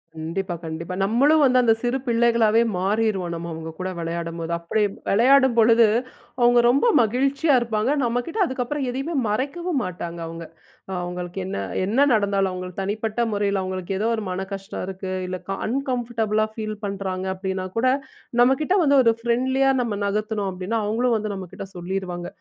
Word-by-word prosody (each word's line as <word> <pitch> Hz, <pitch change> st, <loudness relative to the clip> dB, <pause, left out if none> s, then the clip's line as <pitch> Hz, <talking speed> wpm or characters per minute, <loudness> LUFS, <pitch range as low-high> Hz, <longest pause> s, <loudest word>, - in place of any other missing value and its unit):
கண்டிப்பா, 175 Hz, +3 st, -3 dB
கண்டிப்பா. 165 Hz, +3 st, -5 dB
நம்மளும் 285 Hz, +9 st, +4 dB
வந்து 255 Hz, -1 st, +4 dB
அந்த 225 Hz, -1 st, +5 dB
சிறு 245 Hz, +2 st, 0 dB
பிள்ளைகளாவே 230 Hz, -1 st, +3 dB, 0.2 s
மாறிருவோம். 195 Hz, -2 st, 0 dB
நம்ம 170 Hz, +1 st, -5 dB
அவுங்ககூட 160 Hz, +3 st, -6 dB
விளையாடும்போது. 165 Hz, 0 st, -4 dB
அப்பிடி 210 Hz, +6 st, 0 dB, 0.3 s
விளையாடும் 260 Hz, +3 st, +5 dB
பொழுது 230 Hz, 0 st, +6 dB, 0.5 s
அவுங்க 240 Hz, 0 st, +6 dB
ரொம்ப 275 Hz, -, +3 dB
மகிழ்ச்சியா 275 Hz, +6 st, +2 dB
இருப்பாங்க. 230 Hz, +2 st, 0 dB
நம்ம 240 Hz, 0 st, 0 dB
கிட்ட 405 Hz, +6 st, -5 dB
அதுக்கப்பறம் 260 Hz, +1 st, -2 dB
எதையுமே 270 Hz, +7 st, -3 dB
மறைக்கவும் 280 Hz, +8 st, -1 dB
மாட்டாங்க 170 Hz, -1 st, -5 dB
அவுங்க. 165 Hz, 0 st, -7 dB, 0.4 s
அ -, -, -5 dB
அவுங்களுக்கு 180 Hz, +1 st, -5 dB
என்ன 190 Hz, -, -4 dB, 0.3 s
என்ன 225 Hz, +7 st, 0 dB
நடந்தாலும் 200 Hz, -3 st, +2 dB
அவுங்களுக்கு 185 Hz, +1 st, -5 dB
தனிப்பட்ட 215 Hz, +3 st, -2 dB
முறையில 200 Hz, -1 st, 0 dB
அவுங்களுக்கு 185 Hz, 0 st, -4 dB
ஏதோ 220 Hz, -, +1 dB
ஒரு 220 Hz, -, -4 dB
மன 185 Hz, +1 st, -3 dB
கஷ்டம் 195 Hz, 0 st, -5 dB
இருக்கு. 190 Hz, 0 st, -6 dB, 0.2 s
இல்ல 185 Hz, 0 st, -4 dB
கா 195 Hz, -, -2 dB
அன்கம்ஃபர்டபுளா 235 Hz, -4 st, 0 dB
ஃபீல் 215 Hz, -1 st, -4 dB
பண்றாங்க 190 Hz, -2 st, -3 dB
அப்பிடின்னா 190 Hz, 0 st, -3 dB
கூட 255 Hz, +3 st, +2 dB, 0.5 s
நம்மக்கிட்ட 270 Hz, +9 st, +3 dB
வந்து 285 Hz, -1 st, +4 dB
ஒரு 230 Hz, -, +5 dB
ஃப்ரெண்ட்லியா 260 Hz, +3 st, +2 dB
நம்ம 230 Hz, -3 st, -2 dB
நகர்த்தணும் 210 Hz, 0 st, -1 dB
அப்பிடின்னா, 185 Hz, +5 st, -2 dB
அவுங்களும் 230 Hz, +3 st, +1 dB
வந்து 215 Hz, -1 st, -3 dB
நம்மக்கிட்ட 190 Hz, 0 st, -7 dB
சொல்லிருவாங்க. 175 Hz, -1 st, -4 dB
215 Hz, 155 wpm, -23 LUFS, 185-245 Hz, 0.5 s, பொழுது